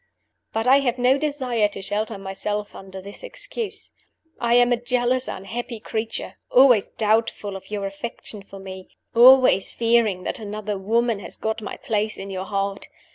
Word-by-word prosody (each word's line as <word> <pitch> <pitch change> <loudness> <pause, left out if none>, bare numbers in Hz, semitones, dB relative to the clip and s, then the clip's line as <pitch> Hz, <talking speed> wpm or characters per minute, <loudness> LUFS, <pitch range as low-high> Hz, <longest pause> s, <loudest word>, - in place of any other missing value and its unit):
"But 225 +1 -1
I 265 +2 +6
have 255 -3 0
no 250 +2 +4
desire 260 -7 0
to 205 -1 -6
shelter 210 +2 -1
myself 205 +2 -4
under 190 0 -9
this 200 +1 -8
excuse. - - -5 0.5
I 235 0 +2
am 245 0 +5
a 240 - -2
jealous, 250 +1 +1
unhappy 230 +4 -5
creature; 220 +1 -4
always 250 -5 +5
doubtful 215 -2 0
of 195 0 -10
your 205 -1 -3
affection 200 +1 -6
for 195 0 -12
me; 190 -1 -9 0.2
always 250 -4 +7
fearing 230 -5 +2
that - - -3
another 210 -1 -4
woman 230 +2 +1
has - - -8
got 220 +1 -2
my 210 - -6
place 215 0 -2
in 195 0 -7
your 190 0 -4
heart. 200 0 -2
220 Hz, 165 wpm, -23 LUFS, 200-245 Hz, 0.5 s, always